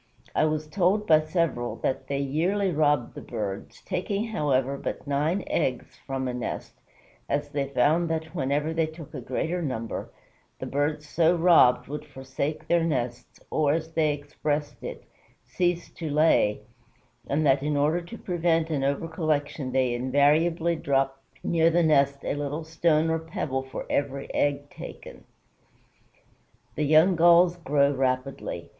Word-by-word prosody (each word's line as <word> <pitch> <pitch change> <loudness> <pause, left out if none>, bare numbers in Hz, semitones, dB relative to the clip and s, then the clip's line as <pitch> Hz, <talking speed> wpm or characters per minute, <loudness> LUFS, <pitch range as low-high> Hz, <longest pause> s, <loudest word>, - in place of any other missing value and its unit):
I - - +3
was 155 0 -1
told 190 +6 +1
by 155 -5 +5
several 155 -7 -1
that 130 - -1
they 140 - -1
yearly 175 +8 0
robbed 150 -5 +1
the - - -8
birds, 100 -2 -6
taking, 200 +2 -2
however, 140 - 0
but - - -5
nine 150 +7 0
eggs 130 -6 -2
from 135 -1 -2
a 125 - -2
nest, 125 -1 -5 0.6
as 145 +1 -1
they 140 -1 -2
found 150 +6 +2
that 160 0 -3
whenever 145 0 -1
they 165 -1 +1
took 160 -1 -11
a - - -5
greater 175 +2 -2
number, 115 -7 -4 0.5
the - - -6
birds 150 +2 -1
so 165 +3 +3
robbed 165 -8 +5
would 150 +3 -5
forsake 135 +3 -5
their 170 -1 +3
nests, 125 -6 -3
or, 150 -2 +2
as 160 0 -3
they 155 -2 +2
expressed 145 0 -3
it, - - -7 0.4
cease 175 -1 -1
to 160 -3 -6
lay, 145 -9 +3 0.7
and 150 +3 0
that 135 -1 +4
in 150 0 0
order 155 +5 +2
to 200 +7 -10
prevent 165 -3 0
an 140 -3 0
over 140 +4 0
collection 155 -4 -2
they 130 -2 +1
invariably 150 +7 +2
drop 135 -2 0 0.2
near 165 -1 +3
the 170 +1 +2
nest 140 -3 +3
a - - 0
little 145 +2 -3
stone 160 0 +2
or 165 - 0
pebble 155 -4 -3
for 130 0 -7
every 140 -1 -2
egg 145 0 0
taken." - - -10 1.5
The 150 - -1
young 160 +5 +5
Gulls 170 +1 +5
grow 145 -3 +2
rapidly. 130 0 -2
150 Hz, 155 wpm, -26 LUFS, 140-165 Hz, 1.5 s, by